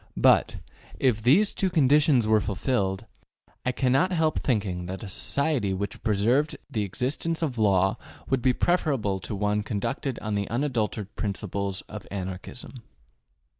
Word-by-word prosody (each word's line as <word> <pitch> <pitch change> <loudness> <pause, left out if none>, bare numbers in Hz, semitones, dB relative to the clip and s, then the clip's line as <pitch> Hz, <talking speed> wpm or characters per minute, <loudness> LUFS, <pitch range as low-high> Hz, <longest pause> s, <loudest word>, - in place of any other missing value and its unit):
But, - - +4 0.4
if 120 -5 +2
these 160 - +4
two 190 - +1
conditions 145 -5 +4
were 110 0 +4
fulfilled, 100 -2 -1 0.6
I 125 - +1
cannot 135 +8 +2
help 160 -3 +1
thinking 95 -8 -1
that 95 +3 -6
a - - -6
society 125 -1 -1
which 100 +2 -4
preserved 115 +8 +1
the 110 - -1
existence 140 - -2
of 130 -7 -2
law 95 -2 +3 0.3
would 135 -2 +1
be 130 - +4
preferable 135 - +1
to 105 - -5
one 105 +1 0
conducted 115 +5 -3
on 105 -1 -4
the 100 -1 -1
unadulterated 115 -6 -2
principles 100 -2 -3
of - - -10
Anarchism. 95 +6 -7
110 Hz, 140 wpm, -26 LUFS, 100-135 Hz, 0.6 s, But